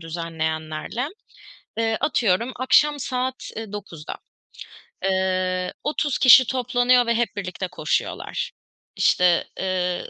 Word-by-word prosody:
düzenleyenlerle. 160 - -4 0.7
Eee, 225 -1 +1
atıyorum 230 -3 +1
akşam 290 +3 +3
saat, 255 0 -3
eee, 220 -2 -6
9'da, 190 -7 -7 0.9
eee, 185 -1 0
30 295 -2 -1
kişi 255 -1 +8
toplanıyor 245 0 +2
ve 235 - +1
hep 235 -2 -1
birlikte 185 -1 -4
koşuyorlar. 155 -4 -3 0.5
İşte, 180 -2 +3
eee, 180 -1 -2
200 Hz, 100 wpm, -23 LUFS, 180-250 Hz, 0.9 s, kişi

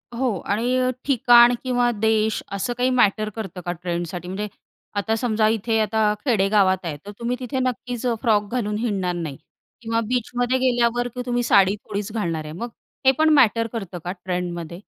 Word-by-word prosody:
हो. 240 -6 0
आणि 235 +5 0
अ, 255 0 +2 0.2
ठिकाण 240 -2 +6
किंवा 245 -1 +1
देश 220 0 +1
असं 200 +5 -2
काही 250 +1 +2
मॅटर 215 -4 +2
करतं 195 -5 -6
का 175 - -1
ट्रेंडसाठी 175 0 -4
म्हणजे 205 +3 -3 0.5
आता 220 +2 0
समजा 220 -2 +1
इथे 225 +1 +1
आता 215 0 +2
खेडे 210 -7 +2
गावात 190 -3 +4
आहे. 150 -3 -3
तर 205 - -7
तुम्ही 240 +1 -1
तिथे 260 +1 -3
नक्कीच 250 -1 -3 0.2
फ्रॉक 210 -3 +2
घालून 210 -4 -1
हिंडणार 195 -6 -1
नाही 155 -6 -5 0.4
किंवा 230 0 -1
बीचमध्ये 245 +1 0
गेल्यावर, 245 -1 +2
की 250 +1 -6
तुम्ही 245 -1 0
साडी 200 -3 +4
थोडीच 210 0 -5
घालणार 165 -8 -2
आहे. 150 - -8
मग 235 +8 -5 0.4
हे 265 - +8
पण 315 0 +4
मॅटर 230 -4 +4
करतं 195 -6 -5
का 180 - -2
ट्रेंडमध्ये? 175 -2 -4
220 Hz, 175 wpm, -23 LUFS, 195-245 Hz, 0.5 s, हे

